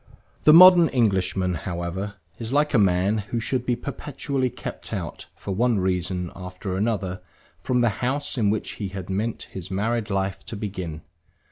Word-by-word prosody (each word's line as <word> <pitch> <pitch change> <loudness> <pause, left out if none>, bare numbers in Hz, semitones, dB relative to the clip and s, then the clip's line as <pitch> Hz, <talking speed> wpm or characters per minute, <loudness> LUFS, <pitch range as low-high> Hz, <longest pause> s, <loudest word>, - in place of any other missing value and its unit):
The 150 - +9
modern 175 0 +9
Englishman, 95 -6 +1
however, 90 +3 -4 0.2
is 115 0 -5
like 150 +2 +2
a 120 - +5
man 95 +2 +3
who 105 +3 -3
should 125 +2 -2
be 120 - +2
perpetually 135 0 -3
kept - - -8
out, - - -5
for 100 - -5
one 120 +3 +2
reason 90 -1 -1
after 90 +1 -5
another, 95 -3 -1 0.4
from 125 -1 +1
the 120 - +4
house 140 +4 -1
in 110 -5 +2
which 110 +1 -1
he 100 - -1
had 95 -1 -6
meant 105 +4 -2
his 95 -2 -7
married 110 +3 -1
life 95 -1 -2
to - - -5
begin. 95 -6 -5
100 Hz, 165 wpm, -24 LUFS, 95-120 Hz, 0.4 s, The